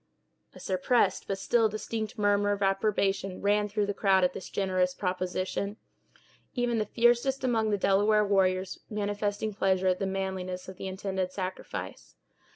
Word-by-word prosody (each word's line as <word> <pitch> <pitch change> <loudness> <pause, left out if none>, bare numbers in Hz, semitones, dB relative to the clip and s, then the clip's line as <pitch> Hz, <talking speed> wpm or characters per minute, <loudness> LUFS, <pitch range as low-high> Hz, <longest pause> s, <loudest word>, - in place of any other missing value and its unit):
A - - -11
suppressed, 190 +6 +1
but 195 - -2
still 225 +3 +2
distinct 220 +2 -4
murmur 205 -1 +2
of 200 0 -2
approbation 195 -1 0
ran 205 +1 +2
through 205 0 0
the 205 - -2
crowd 195 -2 +3
at 180 0 +2
this 185 - -7
generous 185 -2 0
proposition; 185 +2 -2 0.8
even 245 -2 +1
the 215 - -1
fiercest 240 +4 +2
among 225 -4 +1
the 205 - +1
Delaware 205 +2 +3
warriors 190 -2 +1
manifesting 205 0 -2
pleasure 190 -1 +2
at 185 - +1
the 195 - -1
manliness 190 -1 -3
of 190 -1 -9
the 190 - -5
intended 190 -1 -3
sacrifice. 185 -1 -6
200 Hz, 155 wpm, -29 LUFS, 190-210 Hz, 0.8 s, crowd